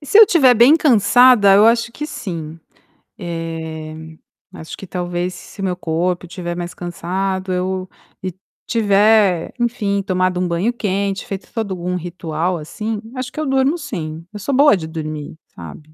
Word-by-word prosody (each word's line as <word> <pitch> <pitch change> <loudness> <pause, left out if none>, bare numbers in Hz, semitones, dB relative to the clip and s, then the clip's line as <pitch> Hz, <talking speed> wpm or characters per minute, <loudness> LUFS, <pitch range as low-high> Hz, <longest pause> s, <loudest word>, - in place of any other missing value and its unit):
E, 290 - -13
se 405 - +5
eu 445 - +11
estiver 280 -10 +5
bem 245 +7 +6
cansada, 245 -5 +5
eu 205 +2 +6
acho 230 0 +3
que 300 +4 -5
sim. 165 - -6 0.6
Eh, 165 -2 -5 0.6
acho 160 - -9
que - - -9
talvez 180 0 -3
se 200 - -11
meu 185 -2 -1
corpo 175 +1 -2
estiver 175 -1 -5
mais 175 0 -5
cansado, 185 +2 -3
eu 185 0 -2 0.3
e 185 -1 -3 0.3
tiver, 205 -4 +3
enfim, 210 -4 0
tomado 185 -2 0
um 180 - 0
banho 175 +8 0
quente, 200 -3 -2
feito 195 -1 -7
todo 200 -5 -3
um 180 +1 -2
ritual, 175 0 -3
assim, 210 +7 -5
acho 255 -1 -4
que - - -7
eu 310 - -1
durmo 270 +3 +2
sim, 165 - -6
eu - - -6
sou 275 +8 -3
boa 285 -2 +6
de 160 -3 -6
dormir, 155 -2 -6 0.2
sabe, 155 0 -11
185 Hz, 165 wpm, -19 LUFS, 175-225 Hz, 0.6 s, eu